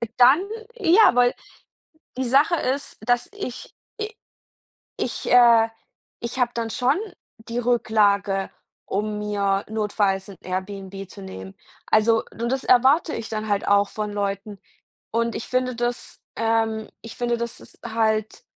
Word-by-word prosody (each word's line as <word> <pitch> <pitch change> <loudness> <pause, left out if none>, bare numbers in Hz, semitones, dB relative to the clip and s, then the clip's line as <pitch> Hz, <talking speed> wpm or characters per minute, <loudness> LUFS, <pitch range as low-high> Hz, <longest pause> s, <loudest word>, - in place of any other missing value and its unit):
Und 235 - -4
dann 255 +6 +7 0.4
ja, 390 - +5
weil 245 0 +4 0.8
die 260 - 0
Sache 275 +7 +4
ist, 280 -2 -2
dass 245 0 +1
ich, 255 -12 -7 0.3
i 430 +1 -4 0.8
ich - - -3
äh, 235 -2 +7 0.5
ich 235 +2 -5
habe 245 -1 +2
dann 230 -1 -2
schon 255 +6 +1 0.4
die 230 +1 -7
Rücklage, 210 -5 +2 0.4
um 210 +1 -2
mir 200 -1 0
notfalls 205 -3 0
'n 195 - -11
Airbnb 195 +1 -5
zu - - -11
nehmen. 95 0 -9 0.3
Also 225 +1 +3
und 235 +1 -3
das 265 0 -1
erwarte 265 +6 +4
ich 230 - -5
dann 215 -1 -3
halt 200 -1 0
auch 200 0 +4
von 210 -1 -4
Leuten 200 0 -3 0.5
und 230 +1 0
ich - - -5
finde 255 0 0
das, 240 +1 -3
ähm 225 -1 0
ich 230 0 -9
finde, 240 -1 0
das 235 0 -4
ist - - -12
halt 220 - 0
225 Hz, 145 wpm, -23 LUFS, 205-245 Hz, 0.8 s, dann